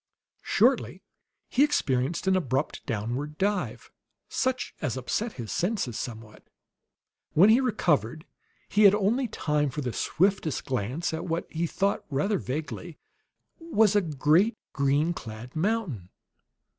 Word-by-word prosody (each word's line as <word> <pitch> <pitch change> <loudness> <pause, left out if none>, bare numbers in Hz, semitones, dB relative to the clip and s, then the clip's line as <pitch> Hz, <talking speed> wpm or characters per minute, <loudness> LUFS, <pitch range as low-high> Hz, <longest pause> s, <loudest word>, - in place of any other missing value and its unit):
Shortly - - +2 0.4
he 265 - +3
experienced 145 - 0
an 190 0 +3
abrupt 135 -5 -1
downward 125 +6 -3
dive, 200 +1 -2 0.4
such 260 -1 -1
as 130 -6 -2
upset 210 - -2
his 115 -4 -7
senses 180 - -1
somewhat. 110 -3 -8 0.9
When 195 +7 +7
he 240 +4 +5
recovered, 155 - 0 0.4
he 210 - +1
had 200 - +8
time 200 - +1
for 135 - -11
only 135 - -3
the 120 - -2
swiftest 190 -4 0
glance 130 +7 -2
at 160 +2 -3
what, 165 0 -1
he 165 +1 -1
thought 200 +4 0
rather 170 +8 0
vaguely, 150 +4 -5 0.6
was 220 - +2
a 205 - +5
great 165 - +2 0.2
green 145 +4 +2
clad 115 -1 -9
mountain. 160 - -1
160 Hz, 130 wpm, -27 LUFS, 130-200 Hz, 0.9 s, had